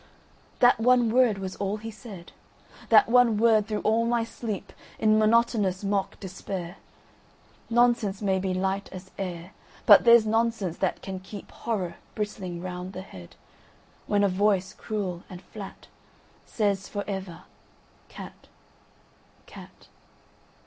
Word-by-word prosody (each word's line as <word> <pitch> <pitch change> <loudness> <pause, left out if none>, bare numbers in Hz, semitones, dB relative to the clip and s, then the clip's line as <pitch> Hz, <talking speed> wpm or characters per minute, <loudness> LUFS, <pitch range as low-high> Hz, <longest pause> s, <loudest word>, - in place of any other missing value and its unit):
…"That 245 -2 +6
one 240 -1 +4
word 240 -4 +4
was 190 -1 -5
all 200 +1 -2
he 225 +1 -7
said, 205 -5 -11 0.6
That - - +7
one 235 -2 +4
word 220 -1 +4
through 210 -1 -2
all 225 +2 +2
my 235 -1 +1
sleep, 225 -3 -6 0.2
In 215 0 +3
monotonous 215 -4 +2
mock 195 -1 -1
despair. 190 -2 -6 0.9
Nonsense 235 -4 +2
may 195 -2 +1
be 190 0 -2
light 190 +2 -1
as 185 0 -10
air, 180 -2 -5 0.3
But - - +8
there's 235 -2 +7
Nonsense 225 -5 0
that 190 - -1
can 190 -1 -5
keepHorror 195 -1 -5 0.2
bristling 190 -5 -4
round 180 +1 -6
the 185 - -6
head, 90 - -13 0.7
When 205 -1 +2
a - - +5
voice 190 -1 +1
cruel 190 -5 -4
and 180 - -9
flatSays 200 0 -5
for 205 -1 -3
ever, 190 -4 -6 0.7
"Cat!… - - -11 1.0
Cat! - - -14
200 Hz, 130 wpm, -26 LUFS, 190-225 Hz, 1.0 s, But